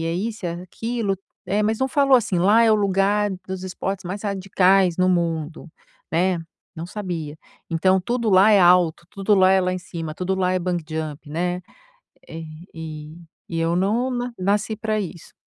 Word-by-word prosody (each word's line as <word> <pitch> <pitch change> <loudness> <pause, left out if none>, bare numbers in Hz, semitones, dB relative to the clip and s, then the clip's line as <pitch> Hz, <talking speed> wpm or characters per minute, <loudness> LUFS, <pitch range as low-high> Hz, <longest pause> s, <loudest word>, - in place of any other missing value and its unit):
isso, 215 +1 -4
é 170 - -3
aquilo, 225 +2 -2 0.3
é, 200 +3 0
mas 215 +1 +1
não 265 - +1
falou 275 0 +4
assim: 210 -7 -1
"Lá 210 +6 +5
é 225 - +5
o - - +5
lugar 200 +1 +2 0.2
dos 190 0 -5
esportes 190 +1 -4
mais 185 +4 -5
radicais 190 -2 +2
no 185 0 +3
mundo", 165 -2 -1 0.4
né, 175 +2 +1 0.4
não 165 +1 -6
sabia, 170 -7 -5 0.3
então 185 +3 +2
tudo 235 +3 -1
lá 190 +3 +6
é 205 - +6
alto, 175 -2 +4
tudo 200 +1 +1
lá 190 -1 +5
é 190 0 +4
lá 180 0 0
em 185 - -2
cima, 165 -3 -6
tudo 185 +2 -1
lá 185 -1 +1
é 185 - +1
bungee 175 -1 -2
jump, 155 -1 -6
né, 175 +3 -2 0.7
eh, 165 0 -7 0.3
e 155 -1 -8 0.3
e 165 - -3
eu 165 +1 +1
não 215 +8 +1
na 245 -1 -3
nasci 205 +3 0
pra 215 0 -1
isso. 180 -4 -7
185 Hz, 180 wpm, -22 LUFS, 170-210 Hz, 0.7 s, lá